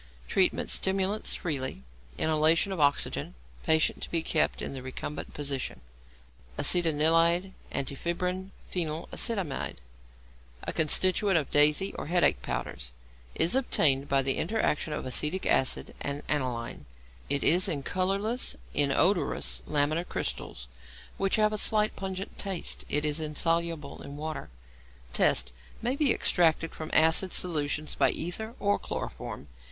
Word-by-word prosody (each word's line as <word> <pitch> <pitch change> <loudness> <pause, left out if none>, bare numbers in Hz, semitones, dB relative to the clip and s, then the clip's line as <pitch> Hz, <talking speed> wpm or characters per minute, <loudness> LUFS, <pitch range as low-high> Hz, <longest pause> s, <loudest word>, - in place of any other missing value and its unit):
Treatment. - - +1
Stimulants 195 +2 +1
freely, 135 - -3 0.3
inhalation 160 +4 +3
of 190 - -3
oxygen, 145 - +1 0.3
patient 160 -1 +2
to - - -5
be 165 -1 0
kept 155 - 0
in - - -4
the 135 - -6
recumbent 130 +3 -6
position. 140 - -3 0.8
=Acetanilide, 165 +2 +3 0.2
Antifebrin, 180 +7 -2 0.2
Phenylacetamide= 170 - -2 0.9
(a - - -3
constituent 185 +4 +3
of 150 - -2
'Daisy' 150 +6 +4
or - - -5
'headache' 175 +2 +3
powders), - - -4 0.4
is 170 - +3
obtained 145 - +3
by 135 0 +3
the 135 0 0
interaction 165 -5 0
of 150 - -4
acetic 150 +8 -1
acid 130 - +1
and 145 0 -4
aniline. 125 -5 -3 0.4
It 140 - +1
is 180 +3 +4
in 140 -4 -2
colourless, 195 - -1 0.2
inodorous, 155 +7 +2
lamellar 155 +4 0
crystals, - - -4 0.5
which 195 0 +1
have 215 0 +2
a 215 - 0
slight 215 0 +2
pungent 190 0 -6
taste. 195 -4 -3
It 150 +1 +1
is 150 +1 0
insoluble 165 0 -1
in 140 0 -9
water. 155 - -5 0.6
Tests. 60 -1 +2 0.3
May 245 +3 -1
be 280 -3 +3
extracted 165 -2 +2
from 155 - -7
acid 160 +4 +4
solutions 155 -3 0
by - - +4
ether 220 +7 -4
or 205 0 +1
chloroform. - - -6
160 Hz, 125 wpm, -28 LUFS, 145-190 Hz, 0.9 s, Daisy